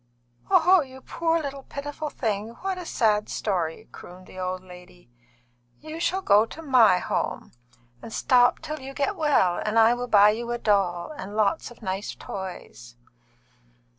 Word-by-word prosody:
"Oh, 370 -1 +5
you 265 -2 -10
poor 330 +3 0
little 280 -3 -5
pitiful 290 +3 -6
thing! 220 -2 -3
What 380 -1 -3
a 355 - -7
sad 210 -3 +1
story!" 175 -6 -2
crooned 180 +1 -12
the 185 - -12
old 185 0 -3
lady. 180 -5 -15 0.7
"You 315 +1 -8
shall 375 +3 -1
go 205 - +5
to 325 - -10
my 245 - +5
home, - - -3 0.5
and 225 - -9
stop 245 +1 +3
till 310 -1 -5
you 270 +1 -9
get 300 +9 -1
well, 290 - +2
and 215 +1 -1
I 225 +1 +6
will 245 0 -4
buy 210 -2 +6
you 235 +2 -5
a 240 - -1
doll 195 - 0
and 200 -4 -8
lots 215 +8 +1
of 240 -1 -16
nice 190 +1 -4
toys." - - -8
225 Hz, 165 wpm, -25 LUFS, 190-290 Hz, 0.7 s, I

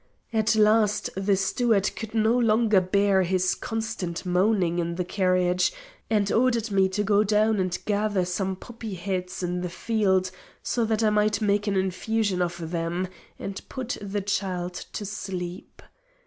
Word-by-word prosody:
At 220 0 +2
last 215 -1 +3
the 195 +1 +1
steward 200 +1 +1
could 225 0 -7
no 220 +1 +3
longer 220 -4 +4
bear 195 +1 +3
his 185 0 +1
constant 220 -6 -4
moaning 180 -1 +2
in 170 0 -2
the 180 0 -2
carriage, 185 -1 +2 0.4
and 205 -3 +1
ordered 235 -2 +2
me 190 -1 +3
to 205 +2 -1
get 205 0 +3
down 215 0 +3
and 185 -2 0
gather 205 -3 +1
some 190 +1 -2
poppy 225 0 -8
heads 180 0 -4
in 180 0 -2
the 180 - -3
field, 190 -2 +1 0.3
so 235 -2 0
that 220 0 0
I 215 - +4
might 210 0 +2
make 205 -1 +1
an 200 - +1
infusion 190 +1 0
of 170 -2 -3
them 175 +2 -2 0.3
and 195 0 -6
put 255 -2 -4
the 205 0 -3
child 185 -3 -2 0.2
to 205 - -4
sleep. 185 -3 -6
200 Hz, 160 wpm, -26 LUFS, 185-215 Hz, 0.4 s, longer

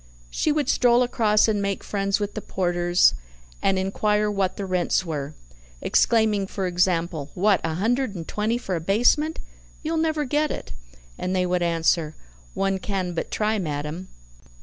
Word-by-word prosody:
She 310 - +1
would 295 -1 0
stroll 245 0 +4
across 220 -4 +3
and 210 -2 +1
make 200 -1 -2
friends 200 0 -1
with 205 0 -3
the 215 - -5
porters, 175 - +2 0.5
and 195 -1 +2
inquire 210 +2 +1
what 195 -2 -1
the 200 - -3
rents 185 0 0
were, 150 -2 -4 0.4
exclaiming 215 - +2
for 195 -1 -3
example: 175 -4 0
"What! 195 +1 +3
a 160 -1 -2
hundred 230 +4 0
and 165 -2 -6
twenty 215 +3 -1
for 190 -6 -3
a 165 - -3
basement? 245 - +2 0.4
You'll 320 +1 -1
never 315 -2 0
get 295 +3 +1
it!" - - -6 0.5
And 185 +1 -2
they 180 -1 +2
would 180 0 0
answer: 165 -2 +1 0.4
"One 195 0 0
can 185 -2 -3
but 170 - -3
try, 215 0 0
madam." 150 +2 -4
195 Hz, 165 wpm, -24 LUFS, 175-220 Hz, 0.5 s, stroll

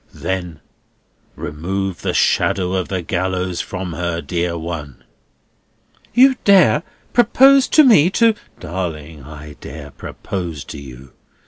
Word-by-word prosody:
Then 90 -4 -4 0.7
remove 90 +5 -4
the - - -2
shadow 90 -1 +1
of 95 -2 -1
the 95 -2 -3
gallows 90 0 -2
from 90 -2 -6
her, 85 0 -3
dear 85 0 -2
one!" 80 -5 -7 1.1
"You 260 +1 +5
dare 190 -6 +5 0.3
propose 265 +3 +5
to 310 - +6
me 205 - +6
to—" 230 +3 +3 0.3
"Darling, 80 -4 -6
I 75 +1 -11
dare 70 -2 -9
propose 85 -5 -6
to 65 - -9
you. 65 -1 -12
90 Hz, 120 wpm, -19 LUFS, 80-100 Hz, 1.1 s, to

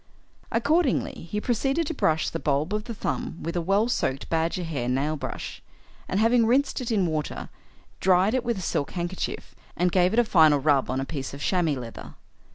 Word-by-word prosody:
Accordingly 280 - +1
he 210 - -1
proceeded 270 +8 0
to 325 - -3
brush 160 - +1
the 165 - -3
bulb 150 +5 0
of 210 +1 -2
the 230 - -6
thumb 170 - -3
with 170 - -3
a 175 - +1
well 195 +6 +2
soaked 135 - -1
badger 165 +2 0
hair 140 -7 -3
nail 140 +5 0
brush, 145 - -6 0.5
and, 190 - 0
having 230 +1 +4
rinsed 265 +3 +2
it 250 - -4
in 205 -5 +2
water, 155 -3 -3 0.5
dried 190 +3 +3
it 255 -2 +1
with 235 -3 -1
a - - -4
silk 140 - -2
handkerchief, 175 +1 -4 0.2
and 180 +1 +2
gave 180 0 +3
it 220 - -1
a - - +6
final 160 -8 +5
rub 140 -1 +2
on 130 +1 -1
a 135 - -2
piece 135 -1 -5
of 140 - -10
chamois 170 -6 +1
leather. 115 -2 -9
180 Hz, 200 wpm, -26 LUFS, 155-230 Hz, 0.5 s, a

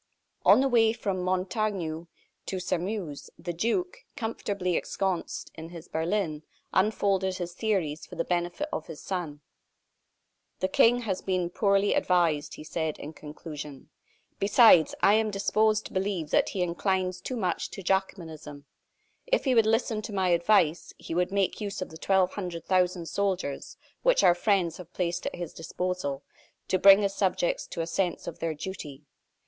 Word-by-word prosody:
On - - +8
the 275 - +3
way 225 -3 +4
from 200 -5 -2
Montaignac 185 -3 -1 0.4
to 190 - -2
Sairmeuse, 180 -4 -3
the 175 +1 -5
duke, 235 - -1 0.2
comfortably 200 -7 -2
ensconced 190 -1 -2
in 160 0 -9
his 170 -1 -10
berlin, 160 -2 -1 0.3
unfolded 190 -2 +1
his 175 -1 -5
theories 180 -7 -1
for - - -10
the 165 - -1
benefit 175 - -1
of - - -3
his 160 -3 -8
son. 165 -6 -4 1.2
"The 185 - 0
King 245 +5 +4
has 195 -5 -2
been 180 -2 -1
poorly 200 +1 +2
advised," 165 -5 +1
he - - -10
said, 160 -1 -3
in 150 - -8
conclusion. 150 -2 -9 0.5
"Besides, 200 -4 +6
I 200 - +7
am 220 0 +3
disposed 215 +2 +1
to - - -9
believe 190 -5 -2
that - - +3
he 185 - -1
inclines 185 +1 -1
too 255 - -4
much 190 -6 -1
to 195 - -8
Jacobinism. 160 -6 -3 0.6
If - - +1
he 260 - +3
would 225 -2 +4
listen 225 -1 +1
to 215 - -7
my 190 -2 +1
advice, 170 -1 +2
he - - -7
would 180 +2 +1
make 200 +1 0
use 200 -2 -4
of 185 - -4
the 160 - -9
twelve 190 0 +2
hundred 175 -5 -5
thousand 180 -2 +1
soldiers 185 -5 -2 0.2
which - - +3
our 175 - +7
friends 175 -2 +1
have 180 -1 -11
placed 175 -1 -2
at - - -4
his 175 -2 -6
disposal, 165 -4 -3 0.5
to 185 - +2
bring 195 +2 +8
his 195 -1 0
subjects - - 0
to 170 - -4
a - - -1
sense 175 +2 -1
of - - -7
their 165 -1 -2
duty. 150 -4 -7
185 Hz, 165 wpm, -28 LUFS, 165-205 Hz, 1.2 s, On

